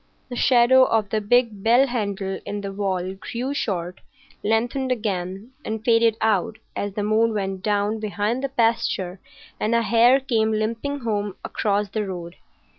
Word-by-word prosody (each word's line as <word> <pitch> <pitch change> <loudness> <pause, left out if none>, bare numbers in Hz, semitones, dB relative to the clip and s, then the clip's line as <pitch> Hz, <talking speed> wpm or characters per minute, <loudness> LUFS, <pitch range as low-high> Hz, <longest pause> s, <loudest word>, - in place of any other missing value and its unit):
The 245 - -5
shadow 255 +1 +5
of 220 -4 +1
the 215 - +1
big 220 -1 +2
bell 240 +5 +5
handle 200 -6 -3
in 205 0 -4
the 200 -1 -5
wall 190 -2 -2
grew 240 +7 -4
short, 180 -9 -3 0.4
lengthened 240 +5 0
again, 200 -1 -3
and 220 +1 -5
faded 230 -2 +4
out 220 0 +1 0.2
as 205 -1 -3
the 210 - -1
moon 220 +1 +2
went 195 -2 -2
down 205 +2 0
behind 215 +4 -2
the 275 - -1
pasture 225 -7 0 0.4
and 220 +2 +1
a 235 - +3
hare 235 +4 +5
came 225 -5 +1
limping 230 +6 -2
home 205 -4 -2
across 205 -1 0
the 210 0 -2
road. 175 -2 -7
215 Hz, 160 wpm, -23 LUFS, 200-235 Hz, 0.4 s, shadow